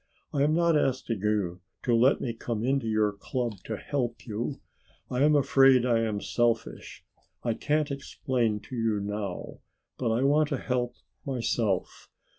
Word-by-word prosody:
I 140 - +1
am 150 +2 +3
not 170 -1 +3
asking 130 -6 0
you 100 -4 0 0.2
to 120 - +1
let 125 +4 +4
me 120 - -2
come 115 -1 -4
into 135 -1 +1
your 110 -1 +2
club 115 +2 -3
to 110 - -3
help 125 -4 -3
you. 120 +4 -3 0.5
I 125 +1 0
am 150 +1 +5
afraid 135 -2 +5
I 120 -2 +3
am 110 -3 -1
selfish, 120 -1 -1 0.4
I 115 - +1
can't 150 +4 0
explain 130 -4 -1
it 105 - -7
to 130 - -5
you 115 -3 +1
now, 100 -2 -4 0.4
but 120 - 0
I 115 +4 +1
want 145 +2 +3
to 140 - 0
help 125 -1 -2 0.3
myself. 115 -7 -1
120 Hz, 165 wpm, -28 LUFS, 110-135 Hz, 0.5 s, am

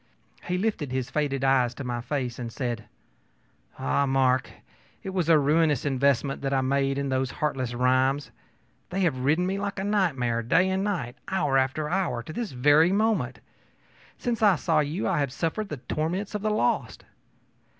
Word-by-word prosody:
He 180 +1 -1
lifted 185 - -1
his 130 -1 -2
faded 140 -3 -1
eyes 130 -3 +3
to 140 - -6
my 120 -1 -3
face 125 -1 -3
and 120 -1 -5
said: 120 -3 -3 0.9
ōAh, 135 - 0
Mark, 130 -1 +2 0.5
it 190 - -4
was 180 -4 -1
a 165 - +7
ruinous 150 -1 +2
investment 135 -1 +1
that 135 0 0
I 135 - +2
made 135 +1 +1
in 140 -1 -2
those 130 0 0
heartless 130 -5 -2
rhymes. 130 +3 +1 0.6
They 190 +2 -2
have 160 -8 +1
ridden 150 +7 +2
me 195 +2 -1
like 200 -1 -3
a 190 - -2
nightmare, 145 - +1
day 165 +11 +2
and 190 +1 0
night, 165 -11 -3
hour 150 -8 0
after 135 +3 +1
hour, 165 -9 -1
to 155 - -8
this 235 +2 -4
very 145 +7 +4
moment. 220 +2 0 0.8
Since 240 -3 -2
I 205 -4 +6
saw 160 0 +1
you 150 +5 -1
I 175 -5 +1
have 140 -3 0
suffered 175 +8 -2
the 150 - -4
torments 165 - -3
of 210 - -3
the 215 - 0
lost. 215 - -1
145 Hz, 180 wpm, -26 LUFS, 130-180 Hz, 0.9 s, a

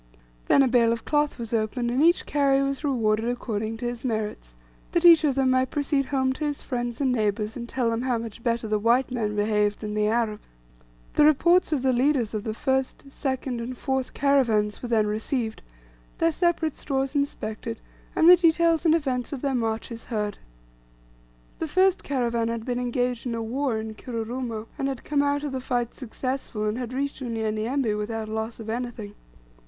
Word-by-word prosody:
Then 275 - +6
a - - +3
bale 235 -2 +4
of 230 -1 -3
cloth 295 -1 +1
was 235 -2 -5
opened, 230 +2 0
and 255 +3 +1
each 340 +3 +4
carrier 275 -1 +2
was 275 +1 -2
rewarded 225 -5 +1
according 225 -2 -3
to 240 - -5
his 240 0 -4
merits, 215 - -3 0.4
that 345 0 +2
each 335 -2 +8
of 285 -4 +2
them 265 -1 +2
might 255 0 +2
proceed 285 -1 0
home 260 -1 0
to 305 - -6
his 295 -1 -2
friends 240 -2 -3
and 270 -3 +2
neighbours, 215 -2 0
and 235 -1 -6
tell 245 -3 0
them 230 +1 -1
how 250 -2 0
much 230 0 -7
better 230 -1 -1
the 215 0 +1
white 240 +4 +2
man 215 -4 -1
behaved 210 0 +1
than 210 -1 -4
the 210 0 +1
Arabs. 220 -1 0 0.7
The - - +4
reports 340 +5 +4
of 280 -4 0
the 260 -1 +3
leaders 250 -3 +2
of 215 -1 -3
the 215 -1 -3
first, 265 +1 -1
second, 260 -3 -3
and 245 +2 -5
fourth 265 0 -2
caravans 235 -7 +2
were 245 - -5
then 220 -2 +3
received, 220 +2 -2 0.6
their 330 0 +3
separate 330 -2 0
stores 270 -1 -2
inspected, 230 -5 -3 0.4
and 325 - +4
the 360 0 +10
details 335 -1 +3
and 320 - +5
events 260 -6 -1
of 280 -2 -5
their 275 -1 +1
marches 230 -1 -3
heard. 210 -3 -3 1.2
The 325 - -2
first 375 +4 +3
caravan 235 -4 0
had 230 -1 -3
been 245 -1 -1
engaged 245 0 -1
in 235 - -2
a 230 - -3
war 250 +1 -1
at 220 0 -6
Kirurumo, 230 -1 -4
and 270 - 0
had 270 -3 -4
come 290 -1 +1
out 285 0 0
of 290 - -3
the 260 -1 -3
fight 245 -2 -1
successful, 255 -3 -4
and 215 +3 -1
had 245 -1 -4
reached 275 +2 -3
Unyanyembe 225 +1 -1
without 215 +1 -3
loss 220 +1 -4
of 225 - -8
anything. 230 -3 -4
245 Hz, 195 wpm, -25 LUFS, 225-275 Hz, 1.2 s, the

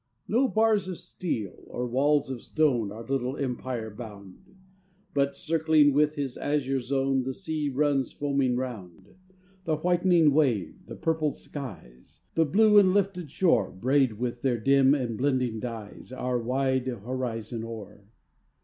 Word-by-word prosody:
No 245 +6 +3
bars 220 -4 +2
of 185 -2 -5
steel 160 - -5
or 125 - -4
walls 140 +3 +1
of 125 -3 -5
stone 125 -10 +1
Our 115 +2 -8
little 135 +1 -2
empire 125 -4 -3
bound, 105 - -11 0.6
But, 140 0 +1
circling 160 -3 +3
with 150 +1 +2
his 140 -4 -3
azure 135 -2 0
zone, 135 +1 0
The 130 0 -4
sea 155 -5 -3
runs 140 -1 +1
foaming 140 -3 0
round; 100 -8 -6 0.5
The 160 - +1
whitening 175 -1 +3
wave, 120 - 0
the - - -8
purpled 160 -2 0
skies, 95 - -10
The 165 - +3
blue 210 +7 +6
and 190 -1 +4
lifted 190 -5 0
shore, 140 - +2
Braid 130 +4 +1
with 120 +2 -4
their 130 -3 +1
dim 135 +3 +4
and 120 -6 -3
blending 130 -4 0
dyes 115 -1 -7
Our 125 -1 -2
wide 130 +1 0
horizon 120 -1 -4
o'er. 110 -3 -9
135 Hz, 145 wpm, -27 LUFS, 120-150 Hz, 0.6 s, blue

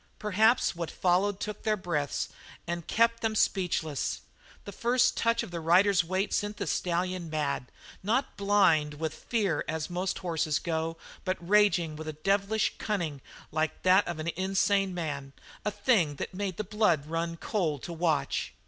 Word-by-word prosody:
Perhaps 215 +2 +3
what 170 -1 -4
followed 190 +2 +1
took 210 - -5
their 215 -1 +1
breaths 155 -7 -2 0.4
and 170 -1 -4
kept 230 0 +2
them 220 -1 0
speechless. 170 -8 0 0.4
The 200 - -6
first 240 +4 +2
touch 230 0 +1
of 215 - -8
his 170 -1 -4
rider's 180 +3 +4
weight 185 +4 -1
sent 205 0 -1
the - - -2
stallion 180 0 -1
mad, 140 -5 -2 0.3
not 235 +8 0
blind 190 -7 +3
with 155 +1 -3
fear 205 -1 -1
as 160 +2 -3
most 180 +2 -1
horses 160 -4 0
go, 165 -1 -2 0.3
but 185 -1 -1
raging 175 -4 +3
with 155 +1 -7
a 155 - -3
devilish 200 +6 +1
cunning 170 -10 -2 0.3
like 155 0 -1
that 185 +2 +5
of 175 -2 -3
an 155 +1 -3
insane 190 +1 +1
man, 140 -5 -4 0.3
a - - +1
thing 205 - +2
that - - -5
made 190 -2 -3
the 215 - -2
blood 200 -8 +1
run 165 +1 -2
cold 165 - -1
to 170 - -5
watch. 160 -4 0
180 Hz, 165 wpm, -29 LUFS, 160-205 Hz, 0.4 s, that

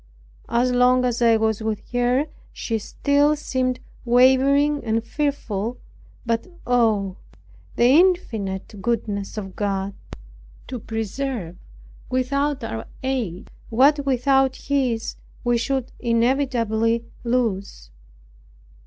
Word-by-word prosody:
As 240 +2 +2
long 250 +1 +4
as 240 -1 -1
I 230 -1 +5
was 220 0 0
with 220 -1 -4
her 245 +3 +2 0.3
she 225 -2 -3
still 285 +7 +2
seemed 255 -3 -1 0.2
wavering 265 +4 +4
and 225 0 0
fearful; 245 -5 -2 0.5
but 230 +4 -1 0.2
oh, 220 -6 +2 0.6
the - - +2
infinite 230 - +2
goodness 205 -3 -2
of 195 -3 -6
God, 200 -1 -2 0.7
to 255 -2 -6
preserve 225 -3 -4 0.5
without 275 +2 0
our 110 - -5 0.2
aid 235 -9 -3 0.2
what 280 +5 +4
without 270 0 +2
His 260 -6 -1 0.3
we 240 -1 +2
should 265 +1 -2
inevitably 230 -2 +1 0.2
lose! 225 - -1
240 Hz, 100 wpm, -23 LUFS, 220-265 Hz, 0.7 s, I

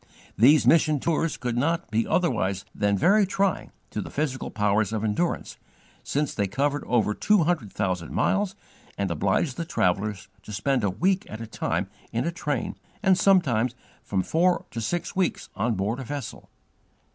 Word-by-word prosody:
These 140 +8 +6
mission 155 -2 +4
tours 165 +2 0
could 120 -2 -3
not 165 +3 0
be 115 +1 +1
otherwise 100 - 0
than 100 -1 +1
very 205 - +4
trying 195 -1 0 0.2
to - - -3
the - - -7
physical 140 -3 -2
powers 105 0 +1
of 110 -1 -2
endurance, 110 +11 -1 0.4
since 145 +1 -1
they 100 -2 0
covered 145 +7 0
over 115 -3 +2
two 210 - +3
hundred 155 - -1
thousand 90 -5 -2
miles 200 -1 +1 0.4
and 100 -3 -1
obliged 100 - 0
the 170 - -1
travellers 100 - -1
to - - -10
spend 125 +4 0
a 100 - +2
week 185 - 0
at 110 - -7
a 115 - -5
time 110 - -2 0.2
in 115 +4 -1
a 170 - 0
train, 150 -6 -3 0.3
and 190 -2 +5
sometimes 135 - +3 0.3
from 95 -2 -1
four 175 - +2
to 115 - -4
six 175 - -2
weeks 185 -2 -1
on 110 +2 0
board 105 +6 -1
a - - -4
vessel. 140 -2 -6
125 Hz, 170 wpm, -26 LUFS, 105-170 Hz, 0.4 s, These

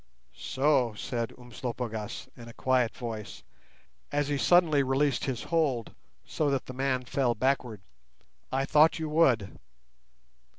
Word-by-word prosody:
"So!" 130 -5 +1
said 115 +1 -3
Umslopogaas, 120 -3 -5
in 120 -1 -11
a 115 - -10
quiet 130 -2 +1
voice, 110 -3 -6 0.7
as 145 0 0
he 145 - 0
suddenly 155 +2 +4
released 135 0 +1
his 130 -3 -3
hold, 145 -9 0 0.3
so 150 -2 -1
that 135 -2 -1
the 130 - -8
man 130 -1 -1
fell 125 -1 0
backward. 125 -4 0 0.7
"I 135 +1 0
thought 155 +4 +5
you 160 -1 -3
would." 130 -11 +2
130 Hz, 130 wpm, -29 LUFS, 120-145 Hz, 0.7 s, thought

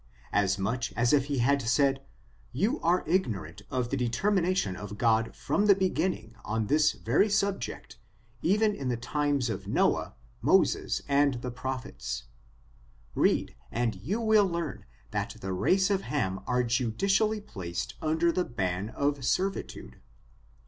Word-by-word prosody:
As 100 -1 +2
much 115 +6 -2
as 120 +2 +2
if 140 -2 +4
he 140 -1 -2
bad 140 +3 +3
said, 135 +3 +2 0.5
you 205 - 0
are 175 +2 +2
ignorant 105 - -1
of 125 -2 -2
the - - +1
determination 170 - +1
of 105 +2 -7
God 115 0 +2
from 205 +1 0
the 200 - +7
beginning, 185 - -1
on 110 0 -1
this 150 +6 +3
very 145 - +2
subject, 200 -1 -2 0.4
even 210 +4 +3
in 135 -9 -4
the 120 - 0
times 140 +2 0
of 110 - -4
Noah^ - - +1 0.3
Moses - - +2
and 140 -1 +3
the 125 - -3
prophets; 130 +1 -5 0.9
read, - - +2 0.2
and 120 -1 0
you 150 - -3
will 220 -3 +4
learn 170 -1 -4 0.3
that - - -3
the 95 0 -4
race 190 - +2
of 195 -1 +1
Ham 95 - -2
are 125 0 +2
judicially 195 - +1
placed 90 - -5
under 160 +2 +2
the 180 - 0
ban 95 - -2
of 140 +2 -1
servitude. 180 - -2
135 Hz, 145 wpm, -29 LUFS, 115-185 Hz, 0.9 s, the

